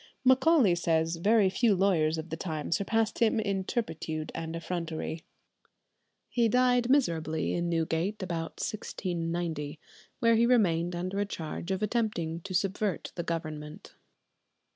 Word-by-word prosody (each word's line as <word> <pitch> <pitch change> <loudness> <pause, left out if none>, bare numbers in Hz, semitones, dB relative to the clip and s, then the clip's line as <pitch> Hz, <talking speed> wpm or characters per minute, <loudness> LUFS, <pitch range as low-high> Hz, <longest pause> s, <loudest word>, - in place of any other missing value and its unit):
Macaulay 260 - +5
says 165 -1 +1
very 205 +3 +4
few 210 +2 +3
lawyers 170 -5 +2
of 160 0 -6
the - - -1
time 160 -3 -4
surpassed 215 +5 +1
him 230 -1 +3
in 200 -3 -1
turpitude 160 - -3
and 165 0 -4
effrontery. 165 -1 -4 1.0
He 235 -2 +2
died 245 0 +3
miserably 165 - +1
in 175 0 -1
Newgate 165 +5 -1
about 165 -3 -3
1690, 170 -7 -3 0.4
where 230 -2 +4
he 235 +1 +4
remained 175 -8 +2
under 185 +3 -3
a 205 - +1
charge 170 -1 -5
of 190 +1 -1
attempting 210 -8 -1
to 185 +1 -5
subvert 195 +1 -1
the 170 - -3
Government. 155 0 -5
175 Hz, 135 wpm, -29 LUFS, 165-215 Hz, 1.0 s, Macaulay